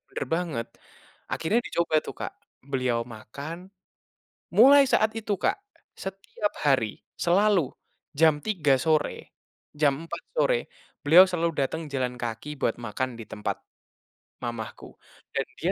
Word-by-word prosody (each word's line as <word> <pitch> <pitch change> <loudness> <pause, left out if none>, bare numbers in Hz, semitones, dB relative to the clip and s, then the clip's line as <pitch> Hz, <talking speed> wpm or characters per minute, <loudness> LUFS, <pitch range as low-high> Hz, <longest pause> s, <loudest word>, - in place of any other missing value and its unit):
Benar - - -3
banget. 160 -10 -2 0.6
Akhirnya 215 +9 +1
dicoba 170 -2 +1
tuh - - -7
Kak, - - -5 0.3
beliau 125 -4 0
makan. 140 - -8 0.8
Mulai 275 +6 +8
saat 215 0 +3
itu 210 -2 -1
Kak, - - +2 0.4
setiap 195 +2 -4
hari, 130 -7 +2 0.2
selalu, 185 -3 +3 0.5
jam 160 0 +5
3:00 155 -11 +3
sore, 155 -1 0 0.4
jam 145 +1 +1
4:00 - - -6
sore, - - +3 0.5
beliau 170 +6 +9
selalu 170 -1 0
datang 160 +3 -4
jalan 125 -2 -1
kaki 120 +5 -5
buat 115 - +1
makan 120 +3 -3
di 115 - -7
tempat, 105 - -3 0.9
mamahku. 115 -2 -6 0.4
Dan - - 0 0.2
dia - - +2
155 Hz, 125 wpm, -27 LUFS, 125-185 Hz, 0.9 s, beliau